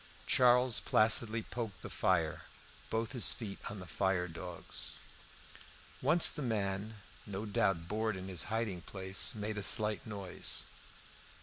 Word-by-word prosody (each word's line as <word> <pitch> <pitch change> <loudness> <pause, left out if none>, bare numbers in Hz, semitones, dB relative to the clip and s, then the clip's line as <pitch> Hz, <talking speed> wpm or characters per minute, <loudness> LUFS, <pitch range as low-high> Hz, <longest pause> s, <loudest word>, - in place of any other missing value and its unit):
Charles 125 -1 +4
placidly 110 +1 +3
poked 115 -5 -6
the - - -7
fire, 85 -4 0 0.4
both 110 0 -2
his 125 -4 +2
feet 105 -4 -7
on 105 - -7
the 90 - -8
fire 95 -1 -1
dogs. 85 +1 -4 1.0
Once 170 0 +6
the 150 - -6
man, 105 -3 -2 0.3
no 100 +1 -5
doubt 95 -5 0
bored 110 +1 -1
in 95 0 -7
his 90 -4 -2
hiding 110 -5 -3
place, 95 +2 +2
made 105 0 -4
a - - -4
slight 105 +4 +3
noise. 100 -4 0
105 Hz, 135 wpm, -33 LUFS, 95-110 Hz, 1.0 s, Once